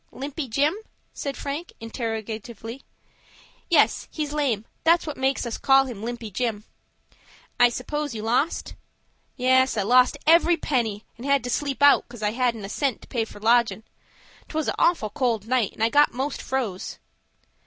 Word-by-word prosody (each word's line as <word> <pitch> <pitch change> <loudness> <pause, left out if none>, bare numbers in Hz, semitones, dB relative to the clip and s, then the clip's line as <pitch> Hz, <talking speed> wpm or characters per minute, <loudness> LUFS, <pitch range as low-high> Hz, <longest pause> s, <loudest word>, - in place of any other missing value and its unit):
"Limpy 280 +2 -5
Jim?" 285 +7 +2 0.4
said 280 -1 -5
Frank, 290 +5 -5
interrogatively. 225 +1 -5 0.9
"Yes, - - +3
he's 300 -2 -4
lame; 255 -8 0 0.2
that's 335 +1 +4
what 300 -2 -4
makes 265 0 0
us 235 - -4
call 270 0 +5
him 240 -6 -7
Limpy 235 -1 -5
Jim." 220 0 -2 1.0
"I 245 - +7
suppose 290 +2 -4
you 215 - -5
lost?" 250 +8 0 0.6
"Yes, 260 -1 +3
I 205 - +1
lost 250 +4 +4
every 335 +1 +5
penny, 230 -9 -1
and 240 - -9
had 280 -3 +3
to 245 - -3
sleep 285 0 -1
out, 285 -4 +6
cos 240 -3 -9
I 210 - +1
hadn't 235 -3 -1
a - - -5
cent 275 +1 -1
to - - -14
pay 230 -3 -1
for 205 - -13
lodgin'. 230 0 +2 0.7
'Twas 315 -1 -2
a - - -2
awful 280 - +2
cold 230 -5 -1
night, 245 -4 +1
and 220 - -3
I 225 - +4
got 290 +4 +4
most 270 +3 -3
froze." 235 -9 -3
250 Hz, 165 wpm, -24 LUFS, 225-280 Hz, 1.0 s, I